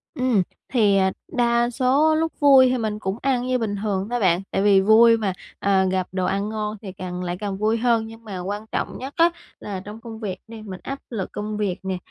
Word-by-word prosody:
Ừm, 255 -6 +2 0.3
thì, 210 -5 +4
à, 190 0 +3 0.2
đa 240 -1 +2
số 275 +6 +3
lúc 325 0 0
vui 270 -3 +7
thì 255 - +1
mình 215 -2 -2
cũng 190 0 -3
ăn 255 -2 0
như 255 0 +2
bình 220 -4 -2
thường 200 -2 -1
thôi 245 - -1
bạn, 180 -4 +3
tại - - 0
vì 200 -1 +5
vui 230 +3 +6
mà, 205 -4 -1 0.3
ờ, 195 -1 +3
gặp 185 -1 0
đồ 185 0 -1
ăn 200 +3 -1
ngon 215 0 -3
thì 195 - -7
càng 180 -1 -6
lại 175 0 -3
càng 200 -2 -3
vui 215 +3 +1
hơn 230 -1 +1
nhưng 225 +1 -12
mà 200 -4 -6
quan 205 +4 -4
trọng - - -3
nhất 270 +2 -7
á, 335 +1 +6 0.3
là 200 -2 -5
trong 210 +2 -9
công 225 -2 -9
việc 195 -4 -4
đi, 225 -1 -9
mình 190 -4 -8
áp 275 +1 -5
lực 215 -6 -4
công 210 0 -4
việc 200 -4 -1
nè, 190 -1 -2
215 Hz, 240 wpm, -23 LUFS, 195-240 Hz, 0.3 s, vui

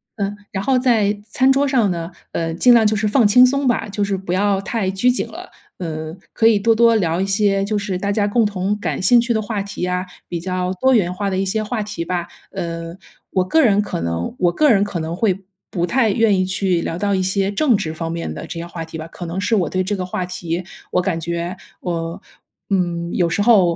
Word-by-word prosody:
然 200 -2 -1
嗯， 205 - -9
然 190 -1 -3
后 265 +4 +2
在 220 -5 +2
餐 265 0 +4
桌 275 +1 +3
上 245 -7 +2
呢， 170 0 -3 0.2
呃， 165 -1 -2
尽 240 +9 +5
量 225 -2 +5
就 215 - +3
是 215 0 0
放 220 +1 +4
轻 250 +5 +7
松 275 +2 +3
吧， 230 -3 0
就 205 +1 -1
是 200 -1 0
不 190 -2 -4
要 195 0 +2
太 195 -1 -1
拘 195 +6 +2
谨 250 - +1
了。 - - -10 0.3
嗯， 160 -2 -5 0.2
可 225 - +1
以 225 -2 +6
多 225 +2 +3
多 230 +1 +5
聊 170 -5 +1
一 190 - +1
些 195 0 +2
就 210 +1 -2
是 200 -3 -3
大 200 +2 -1
家 205 0 +1
共 225 +2 +2
同 205 0 -1
感 160 -6 -2
兴 240 +6 +6
趣 235 0 +1
的 220 - 0
话 205 -2 -3
题 200 - -8
呀， 180 +1 -1 0.2
比 170 - -4
较 185 +1 -2
多 265 0 +4
元 185 -7 +3
化 200 +2 -3
的 190 - -1
一 - - +1
些 215 +3 -1
话 215 +1 -2
题 205 -5 -5
吧。 175 0 -2 0.2
呃， 165 0 -5 0.4
我 185 - +2
个 320 +13 +3
人 205 -4 +4
可 205 - -4
能 85 0 -3
我 175 -1 +2
个 300 - +3
人 200 -4 +4
可 195 -4 -3
能 160 +1 -3
会 195 -1 0 0.3
不 175 -1 -1
太 230 0 +2
愿 210 -2 +3
意 185 - +2
去 185 -2 0
聊 165 +1 -3
到 200 -1 +1
一 185 - 0
些 195 +1 0
政 250 +3 +3
治 160 -5 -2
方 165 0 -4
面 170 0 -4
的 - - -6
这 170 -2 -6
些 170 - -6
话 165 -1 -6
题 160 0 -8
吧。 155 - -6
可 175 +1 -8
能 170 +3 -3
是 225 - +1
我 185 -6 +1
对 185 0 0
这 205 +2 -1
个 185 - -3
话 180 0 -3
题， 175 -1 -4 0.3
我 180 - +2
感 180 -3 -1
觉 170 +2 -3 0.2
我， 165 -1 -3 0.5
嗯， 175 -3 -1
有 175 - +2
时 180 - 0
候， 200 -6 +5
195 Hz, 270 characters per minute, -20 LUFS, 175-215 Hz, 0.5 s, 轻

